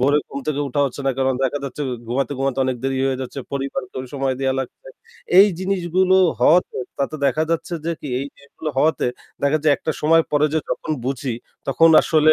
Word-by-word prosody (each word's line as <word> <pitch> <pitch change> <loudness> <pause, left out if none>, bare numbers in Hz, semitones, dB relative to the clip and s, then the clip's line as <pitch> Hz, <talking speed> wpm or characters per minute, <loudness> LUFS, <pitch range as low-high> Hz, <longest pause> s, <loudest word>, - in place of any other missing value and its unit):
ভোরের 145 +3 +3
ঘুম 140 - -6
থেকে 145 -1 -1
ওঠা 140 +2 -1
হচ্ছে 135 +1 -6
না। - - +4
কারণ 130 0 +2
দেখা 140 +2 0
যাচ্ছে 140 +2 -5 0.3
ঘুমাতে, 135 +3 -1
ঘুমাতে 135 -1 -1
অনেক 130 -1 -1
দেরি 135 0 0
হয়ে 135 -1 -1
যাচ্ছে। 130 +2 -6
পরিবারকে 135 -2 -4 0.2
সময় 135 -1 0
দেয়া 135 -1 +1
লাগছে। - - -8 0.5
এই 200 - +9
জিনিসগুলো 185 0 +2 0.2
হওয়াতে 175 +3 +4 0.2
তাতে 140 +3 -1
দেখা 145 +3 +1
যাচ্ছে 165 +1 -1
যে 170 - +1
কি 145 - -6
এই 140 - -4
জিনিসগুলো 140 +2 -7
হওয়াতে 155 0 +2 0.4
দেখা 140 +2 +3
যায় 150 -2 +4
একটা 160 - -3
সময় 165 +2 +5
পরে 150 +1 +4
যে 160 - +3
যখন - - -3
বুঝি, 130 -1 -2 0.3
তখন 165 +5 +5
আসলে 155 -1 +4
140 Hz, 195 wpm, -21 LUFS, 135-160 Hz, 0.5 s, এই